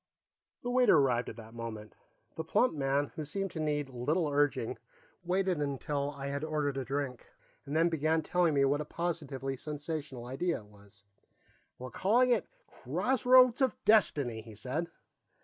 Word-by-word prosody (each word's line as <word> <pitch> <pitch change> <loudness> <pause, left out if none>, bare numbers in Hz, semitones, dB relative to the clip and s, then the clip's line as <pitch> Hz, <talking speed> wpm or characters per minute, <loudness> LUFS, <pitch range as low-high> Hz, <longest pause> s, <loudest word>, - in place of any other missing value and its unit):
The 245 - -2
waiter 250 -8 +5
arrived 125 -4 +2
at - - -8
that 115 -1 -12
moment. 110 -2 -7 0.4
The 160 - -3
plump 210 +10 +2
man, 140 -1 0
who 155 - -5
seemed 195 +6 -3
to 165 - -6
need 150 -2 -1
little 150 +7 0
urging, 145 0 0 0.4
waited 185 -1 0
until 140 0 -2
I 140 -1 -7
had 140 +1 -3
ordered 150 -3 -1
a 135 - -1
drink 135 -2 -4 0.4
and 145 - -3
then 165 +2 +4
began 160 0 +1
telling 175 -2 +2
me 140 0 +4
what 145 +2 +1
a - - -5
positively 145 -5 -3
sensational 145 -3 -5
idea 135 +5 -2
it - - -17
was. 100 0 -19 0.7
"We're 130 0 -8
calling 245 +6 +3
it - - +2 0.2
Crossroads 255 0 +3
of 265 - +2
Destiny," 145 - +3
he 110 -1 -12
said. 130 +10 -3
145 Hz, 165 wpm, -31 LUFS, 135-170 Hz, 0.7 s, waiter